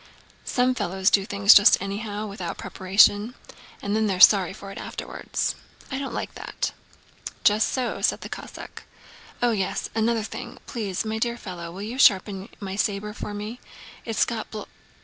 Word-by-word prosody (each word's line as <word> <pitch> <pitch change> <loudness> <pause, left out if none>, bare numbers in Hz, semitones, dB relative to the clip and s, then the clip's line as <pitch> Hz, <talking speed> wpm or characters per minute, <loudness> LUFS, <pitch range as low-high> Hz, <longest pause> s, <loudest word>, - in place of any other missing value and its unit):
"Some 250 0 +2
fellows 190 -4 0
do 195 -1 +3
things 200 0 +6
just 205 - +7
anyhow, 205 +2 -4
without 190 -5 -5
preparation, 205 +5 +3 0.5
and 200 +1 -1
then 220 0 +2
they're 190 -3 -1
sorry 190 -3 +7
for 195 +1 -9
it - - -8
afterwards. - - -3 0.4
I 270 - -2
don't 275 - -4
like - - -4
that." - - -4 0.7
"Just 210 +1 +4
so," 255 -2 -2
said - - +1
the - - -6
Cossack. - - -9 0.6
"Oh 240 - +4
yes, 195 -4 -2
another 225 0 +1
thing! - - -7
Please, 210 -4 -3
my 220 0 -2
dear 235 +1 -1
fellow, 175 -5 -7
will 190 +3 -7
you 235 +5 -5
sharpen 195 -3 +3
my 195 -2 -5
saber 205 +1 -1
for 210 -1 -6
me? 215 +4 -6 0.4
It's 225 -2 +1
got 225 -2 -4
bl..." 215 -1 -6
205 Hz, 170 wpm, -25 LUFS, 195-225 Hz, 0.7 s, just